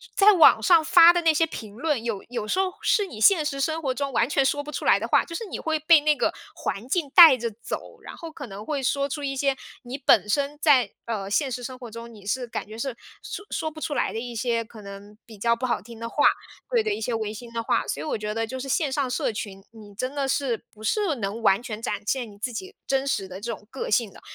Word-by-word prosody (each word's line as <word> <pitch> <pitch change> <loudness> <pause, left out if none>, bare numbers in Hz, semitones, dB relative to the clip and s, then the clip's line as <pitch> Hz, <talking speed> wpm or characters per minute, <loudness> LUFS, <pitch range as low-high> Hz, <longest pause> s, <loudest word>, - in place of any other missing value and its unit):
在 415 +1 +7
网 345 - +7
上 340 -4 +5
发 335 +2 +7
的 350 - +1
那 325 -1 +4
些 325 +2 +3
评 215 -9 -9
论， 290 -1 -1
有 225 -5 -3
有 235 -4 -4
时 375 - 0
候 375 -1 0
是 410 -3 +2
你 220 - -9
现 325 - +5
实 275 -2 -2
生 320 +3 -1
活 265 -3 -1
中 275 +1 -3
完 235 +1 +1
全 275 -2 +2
说 290 +2 +1
不 290 - -10
出 - - -5
来 - - +4
的 - - -3
话。 - - +4
就 335 - -10
是 450 - -4
你 380 - -6
会 315 -1 -1
被 310 0 +6
那 300 0 +3
个 - - 0 0.2
环 200 +6 -4
境 310 -3 0
带 320 -7 +10
着 235 0 -3
走， - - -7
然 - - -10
后 330 - -8
可 285 -3 -8
能 205 +1 -9
会 280 -3 -2
说 280 +2 +1
出 290 +1 -5
一 275 -1 -2
些 275 0 0 0.3
你 245 +2 -6
本 215 -7 +4
身 285 +6 -1
在， 260 -9 +4
呃， 205 -4 -4
现 265 +6 +1
实 245 0 -5
生 255 +1 -6
活 240 -2 -8
中 230 +1 -9
你 205 -2 -15
是 250 +5 -1
感 225 - -5
觉 220 +1 -10
是 255 0 -3 0.3
说 410 - -7
说 315 - -2
不 310 - -11
出 300 - -3
来 - - 0
的 225 - -4
一 240 0 -6
些 230 0 0
可 220 -1 -13
能 200 +1 -11
比 220 -3 -13
较 235 +3 +2
不 255 +2 -3
好 240 - -1
听 230 +1 -12
的 230 - -4
话 290 - +1 0.4
对 475 -3 +2
的， 430 -1 0
一 - - -4
些 230 +2 -2
违 220 -1 -2
心 235 +2 -10
的 230 0 -2
话。 - - 0
所 - - -3
以 - - -5
我 300 - -1
觉 210 0 -4
得 225 0 -1
就 260 +3 -6
是 270 - -6
线 290 +1 0
上 265 -1 -1
社 245 - -1
群， 195 -2 -7
你 210 -3 -14
真 255 +5 -3
的 280 -2 -1
是 260 -4 -1
不 215 0 -15
是 385 - +1
能 210 0 -4
完 205 +1 +3
全 220 -2 -6
展 - - -3
现 245 -1 -1
你 200 - -15
自 245 +4 -3
己 375 - -7
真 270 0 0
实 200 -7 0
的 185 +1 -8
这 235 +3 -6
种 210 - -12
个 265 - -5
性 215 -1 +1
的。 - - -16
255 Hz, 300 characters per minute, -25 LUFS, 220-295 Hz, 0.4 s, 带